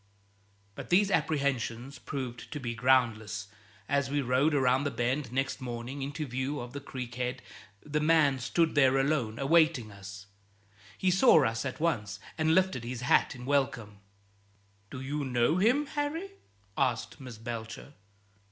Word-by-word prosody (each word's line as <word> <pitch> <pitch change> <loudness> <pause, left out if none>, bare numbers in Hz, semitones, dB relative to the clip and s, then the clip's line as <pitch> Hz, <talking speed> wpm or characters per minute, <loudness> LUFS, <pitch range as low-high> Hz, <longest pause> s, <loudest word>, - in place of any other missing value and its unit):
But - - -9
these 195 +3 +4
apprehensions 135 - -1
proved 125 -3 -6
to 145 - -4
be 120 -3 -3
groundless. 115 -5 +1 0.4
As 140 -2 +1
we 145 +1 0
rowed 135 +4 +2
around 130 0 +3
the 145 - 0
bend 125 0 -1
next 135 +2 -2
morning 125 +2 -5
into 145 +3 -4
view 130 +3 -3
of 120 0 -7
the 140 - -4
creek 125 -3 -7
head 125 0 -3 0.4
the 150 0 -1
man 150 -3 +3
stood 160 +7 +1
there 135 -2 +4
alone, 135 -5 0
awaiting 155 -5 +3
us. 100 0 -10 0.7
He 185 - +2
saw 180 - +6
us 115 +2 -1
at 130 - -4
once, 105 - -1 0.2
and 160 0 +2
lifted 185 -10 +2
his 120 +1 -5
hat 125 - +3
in 125 -1 -9
welcome. 125 -7 -1 0.9
"Do 130 - -7
you 145 +2 -3
know 125 +4 +2
him, 245 +10 +3
Harry?" 305 +7 -3 0.4
asked 125 -4 -1
Miss 125 -4 -9
Belcher. 115 +4 -7
130 Hz, 150 wpm, -30 LUFS, 120-150 Hz, 0.9 s, saw